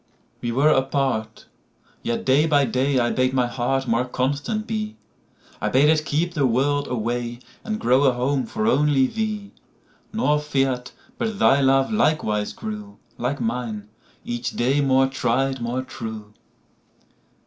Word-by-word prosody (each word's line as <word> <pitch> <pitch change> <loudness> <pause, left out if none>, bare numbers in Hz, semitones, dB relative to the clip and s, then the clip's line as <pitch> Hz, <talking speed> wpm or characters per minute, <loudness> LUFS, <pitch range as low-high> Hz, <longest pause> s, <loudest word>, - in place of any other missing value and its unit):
]WE 120 - -2
were 140 +6 +3
apart: 130 -5 0 0.6
yet, 120 - -2
day 140 +4 +4
by 145 -3 +4
day,I 130 0 +1
bade 130 +1 +1
my 125 -1 +3
heart 130 +2 -1
more 115 +1 +2
constant 145 - -2
be;I 215 -1 -7
bade 140 +3 +4
it 155 -1 +2
keep 165 +4 0
the 145 -5 +2
world 140 +4 +1
away, 120 0 -2 0.3
And 215 -1 -3
grow 130 +4 +3
a 130 - +4
home 130 +2 0
for 215 0 -2
only 150 - +3
thee:Nor 215 - -3
fear'd 135 -3 -1 0.3
but 220 -3 -2
thy 140 -7 +4
love 135 +6 +3
likewise 150 - +1
grew, 210 -2 -7 0.2
Like 130 +4 -1
mine, 115 -3 -3 0.4
each 120 0 -3
day 135 +4 +2
more 135 -1 +4
tried, 135 0 0
more 120 +2 -2
true. 110 -4 -8
135 Hz, 135 wpm, -23 LUFS, 120-150 Hz, 0.6 s, day